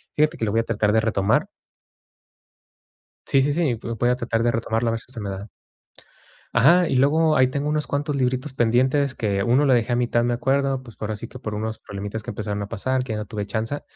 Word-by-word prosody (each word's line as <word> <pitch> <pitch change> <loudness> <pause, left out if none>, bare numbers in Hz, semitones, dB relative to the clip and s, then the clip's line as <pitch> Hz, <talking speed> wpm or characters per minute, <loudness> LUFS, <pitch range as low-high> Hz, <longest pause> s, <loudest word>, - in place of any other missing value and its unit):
fíjate 150 +1 +2
que - - -4
lo 105 - -1
voy 115 - +2
a - - -5
tratar 105 -2 +1
de 110 - +4
retomar. 110 -2 +1 1.8
Sí, 135 - +3
sí, 145 +2 +2
sí, 155 -6 +1 0.3
voy 120 - +3
a 125 - +3
tratar 120 -2 -1
de 120 - +3
retomarlo 115 0 -1
a - - +1
ver 115 - -2
si - - -17
se 120 - -7
me 100 -2 -4
da 95 +2 -6 1.1
ajá, 170 +9 +5
y - - 0
luego, 155 +4 +3
ahí 130 -2 +5
tengo 140 +3 -2
unos 150 0 -1
cuantos 145 +1 -1
libritos 130 +1 -1
pendientes, 130 +3 +2
que 100 -3 -1
uno 125 +6 +3
lo 130 - +4
dejé 120 0 +1
a 120 - +3
mitad, 120 -1 +1
me 120 - +1
acuerdo, 135 +2 0
pues, 115 -4 -14
por 110 0 -4
así 110 +2 -5
que 125 - -11
por 110 -3 -5
unos 110 +1 -3
problemitas 105 +2 -6
que - - -5
empezaron 105 -1 -4
a 100 - -4
pasar, 130 +4 -1
que 120 -3 -4
ya 105 - -3
no 105 - -4
tuve 105 -1 -4
chance, 115 +7 -3
120 Hz, 235 wpm, -23 LUFS, 110-135 Hz, 1.8 s, ajá